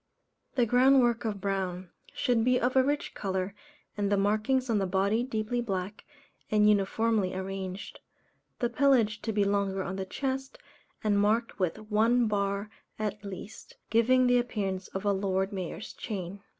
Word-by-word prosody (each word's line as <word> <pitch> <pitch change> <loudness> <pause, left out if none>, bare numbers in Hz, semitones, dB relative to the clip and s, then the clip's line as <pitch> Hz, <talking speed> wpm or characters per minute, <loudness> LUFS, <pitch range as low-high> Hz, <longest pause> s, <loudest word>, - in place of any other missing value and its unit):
The 245 -3 +3
ground 255 +3 +5
work 240 -1 +1
of 210 -3 -2
brown, 190 -2 -3 0.2
should 240 -4 +1
be 250 +1 +3
of 250 +2 0
a 260 - +7
rich 290 +2 -1
colour, 190 -1 -2 0.4
and 205 -1 -1
the 205 - +3
markings 215 +6 +1
on 225 -3 +2
the 195 - 0
body 200 +4 +1
deeply 240 -1 -2
black, 195 -2 -4 0.4
and 210 -1 +4
uniformly 210 -1 +2
arranged. 190 0 -5 0.6
The 240 - 0
pelage 235 -5 +3
to 225 - -2
be 205 -1 +2
longer 200 -1 0
on 190 +1 -4
the 190 - -3
chest, 265 +4 -3 0.5
and 205 -2 +2
marked 215 +2 +1
with 180 -3 0
one 230 +3 +4
bar 200 0 -1 0.3
at 210 -1 -3
least, 200 +2 -9 0.2
giving 255 +3 +4
the 245 0 +4
appearance 195 -6 -3
of 195 +2 -6
a 200 - +3
Lord 190 0 -1
Mayor's 190 +2 -5
Chain. 195 -2 -6
210 Hz, 165 wpm, -29 LUFS, 195-235 Hz, 0.6 s, a